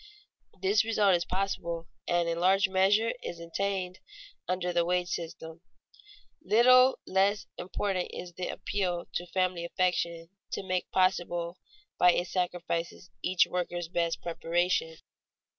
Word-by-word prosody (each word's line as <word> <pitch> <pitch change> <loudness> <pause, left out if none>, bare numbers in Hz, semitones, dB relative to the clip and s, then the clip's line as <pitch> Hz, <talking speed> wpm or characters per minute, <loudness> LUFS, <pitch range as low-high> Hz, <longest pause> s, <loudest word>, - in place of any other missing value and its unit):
This 200 +2 +4
result 215 -3 +3
is 170 -1 +1
possible 180 -3 -2 0.2
and 175 -1 +2
in 165 0 -1
large 190 +2 +4
measure 195 +4 +3
is 170 - -6
attained 185 +2 -3 0.5
under 180 -1 -1
the 170 0 +3
wage 180 +1 0
system. 165 -1 -6 0.8
Little 255 +3 +6
less 195 +2 +2
important 185 0 -2
is 175 -1 -8
the 180 +1 -4
appeal 180 -4 -2
to 175 - -3
family 185 -1 0
affection 170 -2 -1 0.2
to - - -3
make 185 -1 -2
possible 175 -2 0 0.4
by 180 -1 +7
its 175 +1 -2
sacrifices 180 -1 -3
each 180 0 +3
worker's 175 -1 -3
best 170 -1 -1
preparation. 170 -1 0
180 Hz, 125 wpm, -29 LUFS, 170-190 Hz, 0.8 s, by